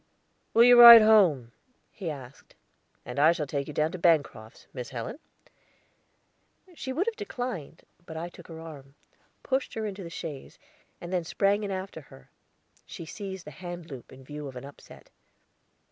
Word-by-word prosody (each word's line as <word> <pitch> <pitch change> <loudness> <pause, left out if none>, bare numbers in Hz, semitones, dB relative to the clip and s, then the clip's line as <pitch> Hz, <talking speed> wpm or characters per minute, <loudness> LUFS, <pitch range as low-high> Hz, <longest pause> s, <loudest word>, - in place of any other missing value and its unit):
"Will 230 - +7
you 245 0 +8
ride 235 -2 +12
home?" 175 - +4 0.4
he 185 -5 -6
asked. 135 -3 -11 0.5
"And 125 - -8 0.2
shall 160 - -3
I - - -3
take 140 0 -4
you 150 - -7
down 155 +1 0
to 185 - -7
Bancroft's, 150 -10 0
Miss 125 -3 -7
Helen?" 120 - -7 1.5
She 270 -5 -6
would 325 +9 -1
have 460 -1 -2
declined, 245 - -6 0.2
but 160 - -8
I 165 +2 -5
took 175 - -15
her 165 -1 -10
arm, 145 -4 -12 0.5
pushed 265 0 -2
her 220 -1 -3
into 200 -1 -6
the 170 - -8
chaise, 160 -5 -8 0.4
and 175 +1 -8
then 180 -2 0
sprang 200 +4 0
in 205 - -4
after 190 -3 -6
her; 65 - -18 0.6
she 165 - -9
seized 190 +1 -8
the 150 - -9
hand 175 +1 -9
loop, 130 -3 -10
in 130 0 -14
view 150 +2 -8
of 135 - -10
an 125 - -8
upset. 140 - -15
170 Hz, 175 wpm, -27 LUFS, 140-205 Hz, 1.5 s, ride